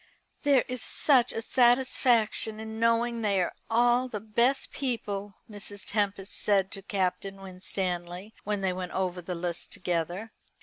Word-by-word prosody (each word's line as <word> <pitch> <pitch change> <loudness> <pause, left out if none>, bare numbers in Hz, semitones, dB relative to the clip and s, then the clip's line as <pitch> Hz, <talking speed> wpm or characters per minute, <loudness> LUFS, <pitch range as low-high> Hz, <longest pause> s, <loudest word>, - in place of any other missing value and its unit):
"There 280 -3 +4
is 255 -2 -4
such 255 -5 +3
a 225 - -3
satisfaction 240 -3 +3
in 220 0 -6
knowing 230 0 +2
they 200 -3 +2
are 180 - 0 0.2
all 240 +2 +3
the 220 -4 -4
best 235 +6 +2
people," 205 -7 -3
Mrs. 205 -1 -6
Tempest 200 -1 -1
said 195 -2 +2
to 195 - -5
Captain 195 0 -2
Winstanley, 185 0 -4
when 205 -1 -1
they 190 -1 +1
went 180 -1 -5
over 185 -1 -1
the 180 +1 -4
list 170 0 -3
together. 180 +5 -2
205 Hz, 145 wpm, -28 LUFS, 190-235 Hz, 0.2 s, There